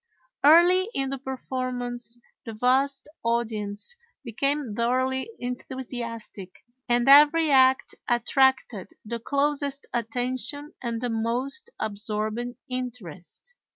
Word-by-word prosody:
Early 350 +6 +6
in 270 0 -1
the 275 - -4
performance 250 -3 -4 0.3
the 225 - -7
vast 265 +5 +1 0.2
audience 225 - -2 0.3
became 275 +1 -1
thoroughly 260 - 0
enthusiastic, 245 -5 -6 0.4
and 240 +1 +2
every 300 +3 +7
act 260 -1 +4 0.2
attracted 240 -4 +2 0.2
the 235 +2 -4
closest 280 +2 -1
attention 250 +5 -2
and 235 -2 -3
the 245 - -1
most 245 - 0
absorbing 215 +3 -3
interest. 250 - -7
250 Hz, 95 wpm, -26 LUFS, 230-275 Hz, 0.4 s, every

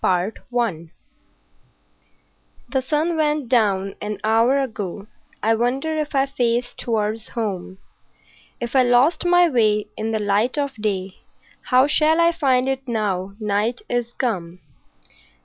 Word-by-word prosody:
CHAPTER 185 +4 0
XIII 200 -10 -2 1.8
The 265 - 0
sun 310 +5 0
went 300 -4 0
down 200 -5 +2
an 210 0 -4
hour 225 +5 +3
ago, 210 -6 -4 0.4
I 225 +1 +3
wonder 260 +7 0
if 300 -1 -3
I 270 0 +3
face 245 -2 -1
towards 220 -1 -2
home; 195 -5 -4 0.8
If 240 +2 -5
I 260 - +6
lost 250 +8 +3
my 355 0 +5
way 215 -7 +1
in 220 +1 -3
the 220 - 0
light 210 +5 0
of 280 -2 -1
day 195 -3 -3 0.5
How 255 -1 +4
shall 310 +2 +3
I 335 0 +5
find 265 -6 +1
it 270 0 -2
now 200 -4 -2
night 215 +3 -1
is 240 -1 -2
come? 180 -8 -3
235 Hz, 135 wpm, -22 LUFS, 210-270 Hz, 1.8 s, I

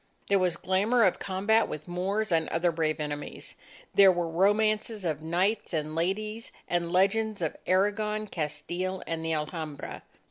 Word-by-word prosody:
There 200 -1 +4
was 180 -2 +1
glamour 205 +7 +2
of 185 - +3
combat 205 +4 +2
with 155 +2 -7
Moors 190 +4 -1
and 160 -1 +2
other 170 +1 +1
brave 155 -1 -1
enemies. 145 -1 -5 0.4
There 195 -1 +8
were 175 -1 -1
romances 210 +4 +1
of 155 -3 -1
knights 180 +4 0
and 155 0 -2
ladies, 210 +7 -2 0.2
and 170 -1 -1
legends 205 +3 +2
of 160 -3 -2
Aragon, 210 +3 +1
Castile, 175 +2 -3
and 165 -1 -3
the 165 0 -1
Alhambra. 155 -1 -4
185 Hz, 150 wpm, -28 LUFS, 165-205 Hz, 0.4 s, There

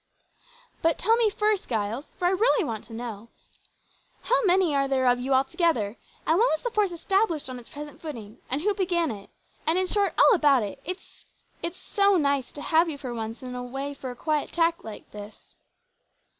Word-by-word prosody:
"But 330 -1 +2
tell 445 +5 +3
me 460 -2 +3
first, 420 0 0
Giles 225 +4 -2
for 355 - -2
I 355 - +4
really 430 +3 +3
want 225 -5 -4
to 230 - -12
know 230 -1 -6 0.9
how - - +2
many 365 -4 +4
are 275 0 +2
there 265 -1 +1
of 245 0 +4
you 260 +2 -3
altogether, 265 - +1 0.3
and 325 +3 +3
when 470 - +5
was 315 - -1
the 485 - -2
force 420 -4 +1
established 345 -4 0
on 250 - -6
its 235 - -13
present 295 0 -9
footing, 230 -9 -8
and 270 +3 0
who 415 +4 +2
began 350 -5 0
it, 200 -1 -9 0.4
and, 325 +2 +3
in 375 - +2
short, 400 +1 +1
all - - +7
about 290 - +4
it. 205 +6 -6
It's 365 +3 -8 0.5
so 400 +1 +2
nice 280 -4 +1
to 290 - -7
have 330 +1 +3
you 295 - -4
for 260 -4 -6
once 225 +2 -5
in 250 -1 -6
a 250 - -4
way 270 +3 -4
for 265 -2 -7
a 245 - -7
quiet 305 +2 -1
chat 335 0 +1
like 220 -1 -10
this." 210 0 -11
295 Hz, 200 wpm, -26 LUFS, 245-365 Hz, 0.9 s, all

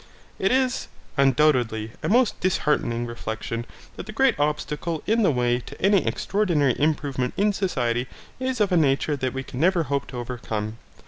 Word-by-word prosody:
It 195 - +2
is, 260 -1 +1 0.3
undoubtedly, 130 -6 +2
a - - -2
most 240 +2 +3
disheartening 140 -9 0
reflection 115 0 -5 0.3
that - - -7
the - - -6
great 265 +4 +3
obstacle 150 +2 -1
in 225 +2 +2
the 200 - +4
way 125 -3 +1
to 120 - -11
any 195 0 +3
extraordinary 170 - +1
improvement 140 -4 0
in 205 +1 +3
society 125 -11 -1 0.3
is 260 -1 -2
of 205 -2 +2
a 180 - +4
nature 145 0 +2
that 130 -2 -2
we 135 +1 -4
can 125 - -8
never 175 +1 +3
hope 140 -4 -2
to 125 - -8
overcome. 115 -3 -4
145 Hz, 170 wpm, -24 LUFS, 120-190 Hz, 0.3 s, the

